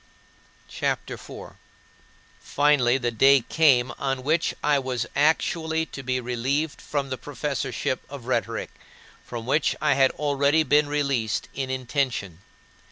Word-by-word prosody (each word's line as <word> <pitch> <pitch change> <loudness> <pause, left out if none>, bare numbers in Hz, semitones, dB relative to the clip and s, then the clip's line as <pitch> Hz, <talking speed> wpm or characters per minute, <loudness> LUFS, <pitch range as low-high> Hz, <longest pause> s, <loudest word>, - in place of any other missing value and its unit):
" - - -32 0.3
CHAPTER - - -2
IV - - -10
7. - - -10 0.8
Finally 140 -4 +2
the 120 -2 -1
day 135 +4 +5
came 130 -2 +3
on 135 -2 -2
which 160 +4 +1
I 145 -1 +3
was 125 -3 -2
actually 160 +2 +1
to 140 - -9
be 130 -1 -1
relieved 130 +5 -2
from 140 -2 -3
the 130 - -3
professorship 145 -2 -3
of 140 -4 -9
rhetoric, 115 -2 -2 0.5
from 115 -2 -7
which 140 +4 +1
I 150 -2 +3
had 135 -1 +4
already 145 +2 +2
been 150 +1 +3
released 140 -7 -1
in 135 -1 -3
intention. 130 - -2
135 Hz, 140 wpm, -25 LUFS, 125-145 Hz, 0.8 s, day